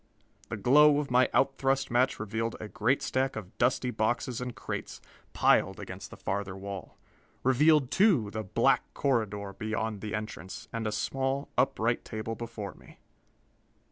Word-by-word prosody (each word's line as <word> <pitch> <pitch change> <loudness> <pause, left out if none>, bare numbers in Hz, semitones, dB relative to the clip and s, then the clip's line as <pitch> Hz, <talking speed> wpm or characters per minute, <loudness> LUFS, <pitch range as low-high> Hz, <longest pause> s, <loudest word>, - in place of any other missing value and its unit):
The 110 - -3
glow 145 +7 +6
of 145 -3 -2
my 125 +1 +4
out 135 0 +2
thrust 135 -1 +1
match 125 +2 +2
revealed 110 +2 -2
a 110 - -6
great 120 +6 +1
stack 130 +1 0
of 105 0 -8
dusty 125 +1 +2
boxes 120 +3 -1
and 125 -1 -5
crates, - - -5 0.3
piled - - +3
against - - -8
the - - -11
farther 95 0 -3
wall. 100 -2 -7 0.5
Revealed, 135 +1 +4
too, 175 - +3
the 110 - -3
black 95 - +2
corridor 105 -7 0
beyond 110 0 -3
the 110 0 -3
entrance, 95 -4 -6
and 115 -1 -2
a - - -1
small, 135 +5 -1
upright 120 -2 +1
table 110 0 -4
before 115 -3 -6
me. - - -17
115 Hz, 155 wpm, -29 LUFS, 105-130 Hz, 0.5 s, glow